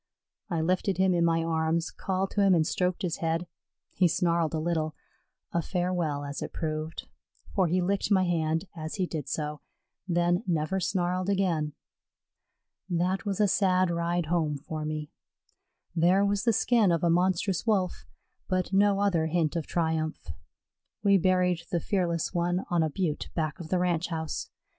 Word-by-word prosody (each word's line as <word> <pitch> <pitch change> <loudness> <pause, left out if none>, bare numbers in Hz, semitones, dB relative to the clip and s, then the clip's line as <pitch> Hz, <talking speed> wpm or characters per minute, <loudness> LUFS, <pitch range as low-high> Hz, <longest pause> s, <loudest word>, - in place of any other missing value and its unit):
I 170 -4 0
lifted 185 +3 +1
him 190 0 +3
in 170 -1 +2
my 165 -1 +2
arms, 165 0 0
called 190 0 -2
to 205 - +1
him 195 -2 +5
and 160 -2 +3
stroked 180 +3 -1
his 175 -3 -1
head. 165 +1 -1 0.5
He 180 - +4
snarled 170 -2 +1
a - - 0
little, 160 -1 -1 0.6
a 170 - +2
farewell 175 -5 -1
as 140 0 -5
it - - -4
proved, 155 0 -4 0.5
for 190 -3 +3
he 180 +3 +1
licked 195 +2 0
my 190 -3 +4
hand 165 -1 0
as 155 -1 -5
he 190 -3 0
did 155 -6 -5
so, 150 +1 -3 0.5
then 175 +1 +2
never 170 +2 0
snarled 180 0 0
again. 170 -7 +1 1.2
That 180 +3 0
was 195 -1 -1
a 210 - +4
sad 185 -2 +3
ride 170 0 0
home 155 -2 0
for 155 +2 -5
me. 155 -1 -4 0.8
There 180 +4 +4
was 200 +1 0
the 235 - +5
skin 220 -4 +3
of 170 -1 0
a 170 - +3
monstrous 185 +3 +1
Wolf, 190 -5 0 0.4
but 185 0 -1
no 200 0 +4
other 175 -6 +2
hint 160 -1 0
of 165 -3 -2
triumph. 160 - -1 0.7
We 200 -2 +5
buried 180 -1 +2
the 175 - 0
fearless 170 -2 -1
one 175 +1 0
on 175 -1 +3
a 160 - +1
butte 155 -1 -2
back 155 -2 -2
of 165 -2 -8
the 185 - +2
Ranch 175 -1 +1
house. 160 -2 -4
175 Hz, 170 wpm, -28 LUFS, 160-185 Hz, 1.2 s, him